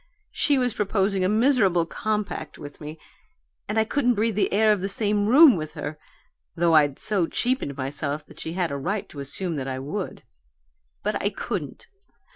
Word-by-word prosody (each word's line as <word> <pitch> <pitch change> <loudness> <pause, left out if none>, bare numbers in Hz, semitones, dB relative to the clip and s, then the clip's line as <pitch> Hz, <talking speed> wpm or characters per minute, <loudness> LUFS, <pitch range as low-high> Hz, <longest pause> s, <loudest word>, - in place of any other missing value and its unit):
She 290 -2 +2
was 250 -3 +1
proposing 195 -2 0
a 185 - +2
miserable 215 -7 +3
compact 210 -4 -3
with 145 +1 -11
me 155 +1 -7 0.7
and 210 - -2
I 220 - +5
couldn't 245 +1 +1
breathe 220 +2 +1
the 210 - +1
air 215 +2 +4
of 205 -3 +1
the 195 - -2
same 205 0 +1
room 275 +3 +8
with 155 -3 -5
her, 150 +1 -6 0.6
though 170 0 +2
I'd 145 -3 +4
so 195 -6 +1
cheapened 245 - -1
myself 140 +2 -3
she 160 - -6
had 175 -3 -1
a 140 - -2
right 195 +8 -3
to 145 - -10
assume 160 +4 -3
that 135 -1 -4
I 130 -1 -3
WOULD. 150 +9 -5 0.8
But 210 - -1
I 205 - +1
couldn't! - - -5
195 Hz, 180 wpm, -25 LUFS, 155-215 Hz, 0.8 s, room